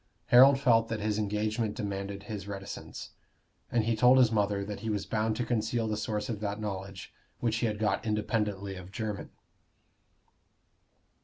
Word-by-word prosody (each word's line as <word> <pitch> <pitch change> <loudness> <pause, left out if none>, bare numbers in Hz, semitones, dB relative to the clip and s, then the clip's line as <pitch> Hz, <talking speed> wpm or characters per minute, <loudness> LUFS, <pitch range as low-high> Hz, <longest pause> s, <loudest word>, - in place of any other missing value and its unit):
Harold 135 +3 +8
felt 115 -4 +4
that 110 -1 -3
his 105 0 -1
engagement 105 +1 -1
demanded 100 -1 -4
his 105 -2 -6
reticence; 100 -1 -7 0.6
and 120 -2 +2
he 115 +1 +1
told 125 +3 +6
his 125 -3 +5
mother 100 -2 +1
that 105 0 -6
he 115 - -4
was 105 -2 -1
bound 110 0 0
to 120 - -2
conceal 115 0 0
the 110 - -1
source 105 -1 -2
of 110 -4 -3
that 105 0 -3
knowledge 95 -2 -6 0.3
which 115 -2 0
he 115 - +1
had 105 -1 -2
got 105 -2 0
independently 105 -2 -1
of 90 0 -10
Jermyn. 105 -1 -4
105 Hz, 165 wpm, -30 LUFS, 100-115 Hz, 0.6 s, Harold